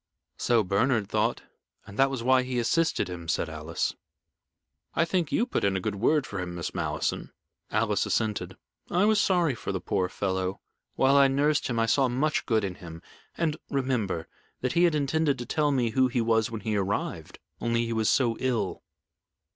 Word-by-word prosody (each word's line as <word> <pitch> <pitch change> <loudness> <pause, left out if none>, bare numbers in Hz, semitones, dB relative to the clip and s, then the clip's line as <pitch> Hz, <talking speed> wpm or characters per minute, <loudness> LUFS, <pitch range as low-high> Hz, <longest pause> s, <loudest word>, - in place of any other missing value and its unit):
"So 115 -2 +3
Bernard 105 +3 +1
thought, - - 0 0.4
and 100 - -11
that 135 0 +5
was 130 -4 -4
why 130 +1 +4
he 125 0 -3
assisted 160 +8 +1
him," 85 -2 -7
said 85 -1 0
Alice. 80 +1 -3 1.0
"I 165 - +3
think 170 -3 -1
you 235 - +2
put 245 - -2
in 100 -1 +2
a - - -1
good - - -2
word 130 +8 +2
for 100 - -5
him, 90 -1 -4
Miss 85 - -4
Malleson." - - -2 0.4
Alice - - +1
assented. 110 -2 -1 0.3
"I 180 +3 +3
was 215 -1 +4
sorry 175 -7 +2
for 115 - -5
the - - -2
poor 90 -1 -1
fellow. 95 -1 -2 0.4
While 135 +1 +4
I 140 -1 +7
nursed 145 +3 +1
him 120 - -2
I 115 - +3
saw 130 +4 +3
much 140 +5 0
good 110 -3 +2
in 95 -2 -2
him. 80 -2 -9 0.3
And, 160 -2 0
remember, 125 - -1 0.3
that 125 - -1
he 175 +1 +4
had 165 -3 +2
intended 145 0 +1
to 120 - -5
tell 150 +2 +1
me 125 -4 +1
who 130 +2 +3
he 125 0 -1
was 110 0 +2
when 115 -2 -6
he 110 +1 -1
arrived, 100 0 -2 0.2
only 115 0 0
he 115 - -2
was 110 -1 +1
so 120 -4 +2
ill." 115 -7 -1
120 Hz, 195 wpm, -27 LUFS, 100-140 Hz, 1.0 s, I